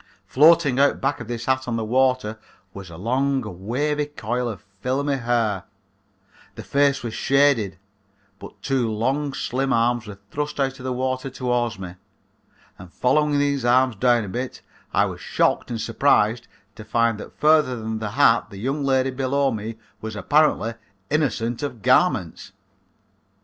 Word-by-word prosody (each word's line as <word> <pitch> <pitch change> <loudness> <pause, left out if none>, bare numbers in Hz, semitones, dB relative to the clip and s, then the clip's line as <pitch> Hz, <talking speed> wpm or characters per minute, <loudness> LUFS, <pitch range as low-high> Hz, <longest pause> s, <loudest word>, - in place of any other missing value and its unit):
Floating 150 -2 +4
out 140 0 +3
back 135 - -1
of 120 - -8
this 120 0 -5
hat 130 0 0
on 120 - -1
the 115 -1 -2
water 125 -2 +1 0.3
was 100 -2 -9
a 80 - -10
long 135 +7 0 0.3
wavery 145 +4 0
coil 125 -3 -3
of 105 -3 -8 0.2
filmy 135 +5 -1
hair, 115 -6 0 0.9
the - - -8
face 140 -1 +1
was 115 -2 -4
shaded, 135 -10 +2 0.6
but - - -12
two 130 -4 0
long 135 +7 -1
slim 135 0 -2
arms 120 -1 +1
were 100 -2 -9
thrust 150 0 -4
out 135 -1 -1
of - - -10
the 130 - -2
water 130 +1 -2
toward 120 -3 -1
me, 90 -1 -8 0.8
and 90 -1 -12
following 145 - +2
these 140 -2 0
arms 125 0 +3
down 120 +1 +3
a - - -6
bit 125 +5 -5 0.3
I - - +3
was - - -6
shocked - - 0
and 115 -2 -3
surprised 115 -1 +2 0.3
to 110 - -11
find 115 0 +1
that - - -11
further 150 -4 +4
than 110 -1 -4
the 110 -1 -3
hat 115 -2 +3
the 100 - -11
young 135 +7 -2
lady 135 -1 +2
below 135 +1 0
me 110 0 -5 0.2
was 110 0 -6
apparently 130 +1 +2 0.4
innocent 120 -6 0
of 125 -8 -5
garments. - - +1
125 Hz, 160 wpm, -23 LUFS, 115-140 Hz, 0.9 s, Floating